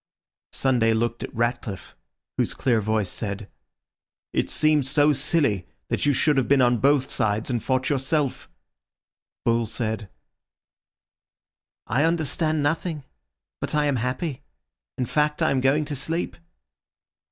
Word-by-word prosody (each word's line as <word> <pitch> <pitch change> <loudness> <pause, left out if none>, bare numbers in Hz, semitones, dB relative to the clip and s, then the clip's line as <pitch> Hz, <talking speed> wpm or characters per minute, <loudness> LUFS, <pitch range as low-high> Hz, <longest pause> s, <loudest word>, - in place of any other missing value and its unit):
Sunday 120 -4 +2
looked 115 +1 -1
at - - -6
Ratcliffe, 120 -4 -3 0.4
whose - - -1
clear 120 -4 +1
voice 110 -1 0
said— 100 -2 -4 0.9
"It - - 0
seems 150 -3 +2
so 150 +1 +4
silly 135 - +1 0.2
that - - 0
you - - +5
should 145 +2 +2
have 135 - +2
been 140 -1 +4
on 120 -2 +4
both 140 0 +3
sides 110 0 0
and 120 -2 -1
fought 130 0 0
yourself." 140 0 -1 1.0
Bull 115 -1 +2
said— 110 -2 -3 1.8
"I 135 +4 +1
understand 160 -1 +1
nothing, 155 0 -1 0.6
but - - -2
I 150 0 +2
am 140 -3 +1
happy. 130 +4 -3 0.6
In 125 - 0
fact, 150 +4 0
I - - +2
am 135 -1 +1
going 140 +4 +2
to 145 - -4
sleep." 145 - -2
130 Hz, 135 wpm, -24 LUFS, 115-150 Hz, 1.8 s, you